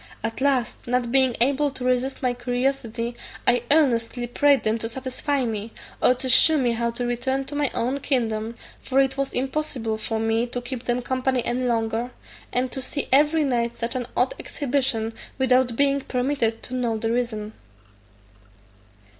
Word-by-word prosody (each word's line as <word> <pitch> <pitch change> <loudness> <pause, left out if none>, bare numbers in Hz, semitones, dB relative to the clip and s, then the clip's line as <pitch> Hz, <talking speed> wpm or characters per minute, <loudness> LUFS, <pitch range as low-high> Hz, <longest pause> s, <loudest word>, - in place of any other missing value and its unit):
At 225 +2 -3
last, 265 -4 0
not 245 -1 0
being 260 -2 +3
able 280 +3 +3
to 260 -2 -7
resist 255 +2 0
my 250 -1 +2
curiosity, 245 -1 -2 0.3
I 245 -1 +4
earnestly 245 -5 +2
prayed 280 +3 +3
them 220 +1 +1
to 225 - -3
satisfy 260 +2 -2
me, 220 -1 -4 0.3
or 250 - +5
to 255 +1 -4
shew 310 +5 +6
me 250 -4 +2
how 235 0 0
to 235 +1 -3
return 260 +3 -1
to 290 - -7
my 290 -2 +1
own 250 +3 0
kingdom; 230 -5 -1 0.3
for 270 0 +1
it 270 -1 +3
was 275 0 -1
impossible 255 -5 -2
for 220 0 -2
me 225 +2 +1
to 245 +1 -4
keep 245 0 -6
them 245 0 0
company 260 -1 0
any 250 +1 -1
longer, 230 0 0 0.4
and 250 0 0
to 265 - -4
see 280 +2 -3
every 300 +3 +5
night 235 -3 0
such 230 +1 -2
an 245 -2 -2
odd - - +2
exhibition, 255 -5 -1 0.2
without 255 -2 +3
being 280 +1 +2
permitted 250 -4 -1
to 255 - -8
know 240 -3 0
the 225 +1 -1
reason. 220 -3 -2
250 Hz, 170 wpm, -24 LUFS, 235-270 Hz, 0.4 s, shew